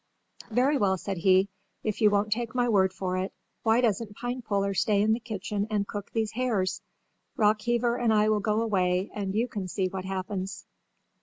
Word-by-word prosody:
"Very 260 +5 +2
well," 190 -3 +2
said 195 +1 -4
he, 190 +2 +4 0.4
"if 215 0 -2
you 210 - +7
won't 205 +1 +1
take 235 +1 -4
my 245 -1 +2
word 190 -4 +3
for 185 0 -3
it, 190 +1 -2 0.3
why 225 +2 +3
doesn't 220 -2 0
Pinepuller 220 -5 -2
stay 205 +1 +2
in 215 +2 +3
the 225 - -1
kitchen 210 -2 -3
and 205 -2 0
cook 205 -1 -6
these 220 -2 -1
hares? 215 -7 -1 0.6
Rockheaver 235 +3 +2
and 230 - +4
I 215 0 +4
will 215 -1 +3
go 215 +2 +1
away 185 -3 +1
and 200 -1 -3
you 230 +3 +2
can 200 -5 -5
see 185 0 -1
what 190 0 -5
happens." 190 0 -4
210 Hz, 185 wpm, -28 LUFS, 190-225 Hz, 0.6 s, you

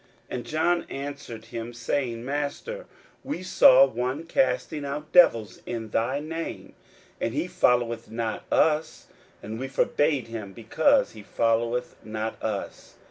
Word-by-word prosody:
41:009:038 - - -2
And 120 - -6
John 170 +3 +1
answered 140 -5 -6
him, 115 +1 -6
saying, 120 0 -2
Master, 145 - -3 0.4
we 275 -10 -4
saw 135 -7 +7
one 130 +4 -3
casting 135 -1 0
out 145 +2 -5
devils 115 - +5
in 115 -2 -4
thy 130 +6 0
name, 165 +2 -6 0.5
and 115 - -2
he 155 +4 0
followeth 125 -12 +1
not 115 -1 -3
us: 155 0 +2 0.4
and 110 +2 -6
we 135 - -3
forbad 145 0 +1
him, 110 -4 -7
because 260 - +2
he 110 - -11
followeth 115 +3 0
not 110 +1 -4
us. 105 -3 -5
125 Hz, 135 wpm, -26 LUFS, 115-150 Hz, 0.5 s, saw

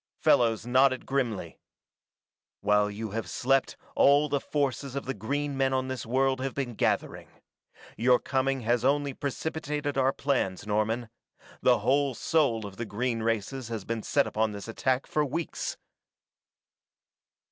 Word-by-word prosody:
Fellows 115 -2 +3
nodded 130 +1 +3
grimly. 115 -11 -2 1.0
"While 105 0 +3
you 105 +1 -5
have 115 +2 -4
slept 135 +1 +1 0.2
all 145 +2 +5
the 140 - +1
forces 140 -2 -2
of 140 - -3
the 135 - -2
green 140 +4 -2
men 135 0 +1
on 130 0 0
this 130 -4 -5
world 130 +2 +2
have 135 0 -3
been 130 -4 -2
gathering. - - -1 0.7
Your 125 +2 +5
coming 135 0 -1
has 120 +1 +1
only 140 +1 +2
precipitated 145 0 -3
our 135 0 +3
plans, 130 -11 -1
Norman 110 +3 0 0.5
the - - +5
whole 135 0 +2
soul 135 -10 +1
of 100 -1 -9
the 115 - -3
green 115 +2 -1
races 115 +3 -2
has 110 -4 -5
been 115 -1 -2
set 140 +5 +2
upon 110 0 0
this 100 +1 -7
attack 130 +3 0
for 150 - 0
weeks!" 155 +4 -3
130 Hz, 145 wpm, -28 LUFS, 115-140 Hz, 1.0 s, all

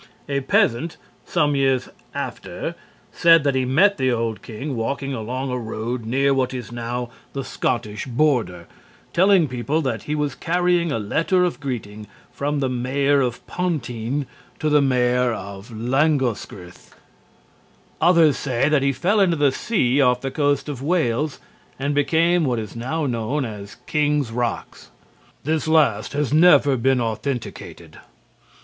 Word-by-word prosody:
A 140 -1 0
peasant 135 +3 +1 0.3
some 150 -4 +1
years 135 -2 +1 0.3
after - - -5 0.4
said 165 -2 +5
that 140 -1 +2
he 130 -1 +1
met 165 +9 +3
the 130 -1 +2
old 115 -2 -2
king 130 +5 -6
walking 135 +4 -2
along 130 +3 -3
a 125 - -2
road 115 +1 -4
near 135 +3 +2
what 130 -1 0
is 125 -2 -6
now 120 +1 -4 0.2
the 135 - -3
Scottish 110 -3 -2
border, 120 - 0 0.5
telling 185 -2 +4
people 130 +5 -1
that 120 -6 -2
he 150 - 0
was 150 -3 -1
carrying 175 +1 +1
a - - 0
letter 165 - +1
of 175 -3 -1
greeting 110 -6 -5 0.2
from 145 +3 -2
the 135 - +1
Mayor 135 +3 +1
of 125 -2 -2
Pontygn 140 -6 -2 0.3
to 155 - -1
the 150 -1 +4
Mayor 125 -2 +2
of 100 +1 -8
Langoscgirh. 120 - -1 1.1
Others 165 -3 +5
say 130 -1 0
that 150 -2 +3
he 140 0 +2
fell 180 +11 +1
into 180 -4 +3
the 145 -2 +3
sea 140 - +1
off 125 -2 +3
the 135 - -3
coast 145 0 0
of 140 -4 -5
Wales 150 -3 0 0.4
and 140 +2 -1
became 165 +4 +2
what 125 -5 0
is 110 -1 -6
now 145 +7 -2
known 125 +3 -1
as 100 -3 -8
King's 150 -4 0
Rocks. 120 0 -4 0.5
This 155 +2 -1
last 145 -10 +2
has 145 -2 -1
never 155 -4 +6
been 130 +1 +2
authenticated. 120 +2 -5
135 Hz, 150 wpm, -22 LUFS, 120-150 Hz, 1.1 s, never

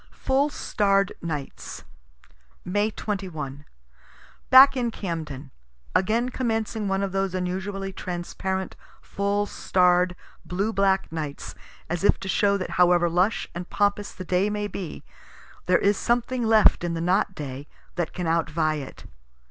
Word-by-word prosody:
FULL 275 +2 +1
STARR'D 195 -7 +1
NIGHTS 150 -5 -6 0.8
May 205 +3 +1
2l. 160 -11 -5 0.8
Back 270 +1 +9
in 245 -2 0
Camden. 155 - -5 0.4
Again 225 +7 +2
commencing 225 -4 -2
one 195 0 0
of 195 - -2
those 195 -1 -1
unusually 190 +2 -3
transparent, 185 +1 -4 0.2
full 200 +1 -1
starr'd, 180 -2 +2 0.3
blue 200 +5 -2
black 195 -3 +2
nights, 150 -3 -5 0.3
as 175 +2 -3
if - - +4
to 190 - -5
show 200 +1 +2
that 185 - -5
however 175 -1 +4
lush 180 +6 +1
and 175 +1 -6
pompous 205 0 0
the 185 - -9
day 185 +3 +1
may 210 0 -2
be, 195 -4 -6 0.6
there 180 -1 +5
is 200 0 +2
something 240 +1 0
left 220 -4 +5
in 170 -1 -1
the - - -3
not 185 +2 +1
day 140 -1 -6 0.3
that 175 -2 -2
can 180 - -4
outvie 160 -1 +1
it. 135 - -11
190 Hz, 140 wpm, -25 LUFS, 175-205 Hz, 0.8 s, Back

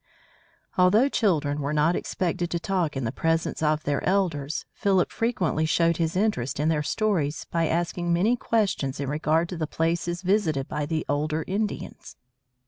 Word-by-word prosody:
Although 210 +9 +5
children 150 - +1
were 140 +2 -2
not 155 +3 +3
expected 175 -1 -2
to 170 - -1
talk 175 -5 -1
in 135 - -2
the 115 - -1
presence 165 +4 -1
of 155 0 +1
their 145 -1 -1
elders, 165 -7 0
Philip 195 -4 +1
frequently 185 -9 0
showed 165 +1 +2
his 165 0 -1
interest 185 - 0
in 150 +2 +2
their 155 -2 +1
stories 160 -2 -1
by 165 -1 +1
asking 175 +1 -1
many 195 +8 +3
questions 195 - 0
in 140 - -2
regard 155 +3 +1
to 180 - -5
the 155 -1 -2
places 170 +3 -1
visited 175 -8 +1
by 150 -1 -3
the 160 0 -2
older 155 +2 -1
Indians. 205 +2 -4
165 Hz, 165 wpm, -26 LUFS, 150-185 Hz, -, Although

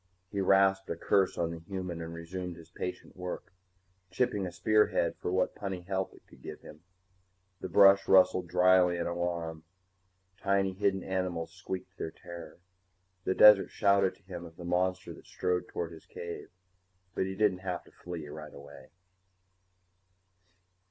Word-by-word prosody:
He 100 - -1
rasped 95 0 +3
a - - -1
curse 95 +3 +2
on 85 -1 0
the 85 - -6
human 90 -1 -5
and 80 0 -6
resumed 85 +2 -6
his 85 0 -15
patient 90 - -6
work, 90 0 -6 0.6
chipping 100 -1 0
a - - -6
spearhead 105 +5 +2
for - - -3
what 95 0 +1
puny 95 -3 -5
help 95 +1 -3
it - - -20
could - - -19
give - - -8
him. 75 - -13 0.8
The 95 - -5
brush 100 +2 +6
rustled 95 -1 +5
dryly 90 0 +4
in 85 - -2
alarm, 85 -2 -3 0.8
tiny 100 -1 +1
hidden 95 0 0
animals 90 -3 -2
squeaked 95 -1 -7
their - - -3
terror, 85 0 -10 0.7
the 95 - +1
desert 105 -2 +8
shouted 100 -1 +3
to - - -28
him 90 -2 -8
of 80 -1 -11
the 85 - -9
monster 90 +1 0
that - - -15
strode 90 0 -1
toward 85 -1 -4
his 80 -1 -13
cave. 85 0 -7 0.6
But 95 - -1
he 95 - -4
didn't 100 -3 +2
have 90 -2 -4
to - - -20
flee 85 -4 -7
right 75 0 -9
away. 70 0 -13
90 Hz, 160 wpm, -30 LUFS, 85-95 Hz, 0.8 s, desert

